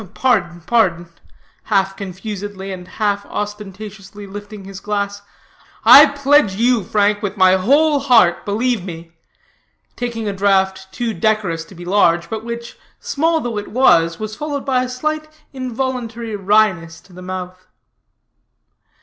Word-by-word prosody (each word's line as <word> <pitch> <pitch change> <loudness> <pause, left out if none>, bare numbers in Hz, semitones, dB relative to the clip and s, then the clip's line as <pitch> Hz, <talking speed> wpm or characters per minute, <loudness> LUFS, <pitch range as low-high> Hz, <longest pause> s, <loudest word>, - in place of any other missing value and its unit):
"Pardon, 175 -10 +1
pardon," 175 -4 +1 0.6
half 195 -2 +1
confusedly 195 0 -6
and 180 -1 -9
half 205 -1 -1
ostentatiously 205 0 -7
lifting 205 0 -9
his 195 0 -9
glass. 200 0 -3 0.6
"I 295 +2 +10
pledge 280 -7 +2
you, 235 0 +2
Frank, 205 +2 +1
with 205 -1 -4
my 185 0 +5
whole 285 +10 +3
heart, 240 -10 +4
believe 225 0 -1
me," 165 -2 -9 0.8
taking 235 -3 -4
a 200 - -1
draught 190 -1 +1
too 230 +3 -3
decorous 210 -7 0
to 190 - -15
be 175 +1 -10
large, 175 -2 +2
but 220 -1 -4
which, 235 0 -7 0.2
small 320 +2 0
though 235 -3 -3
it 205 - -8
was, 170 -9 +3
was 215 0 -5
followed 290 0 -4
by 255 -2 +1
a 255 - -4
slight 305 +4 -3 0.3
involuntary 245 -3 -4
wryness 195 -5 +1
to 190 - -21
the 180 - -11
mouth. 185 0 -7
205 Hz, 140 wpm, -18 LUFS, 190-235 Hz, 0.8 s, I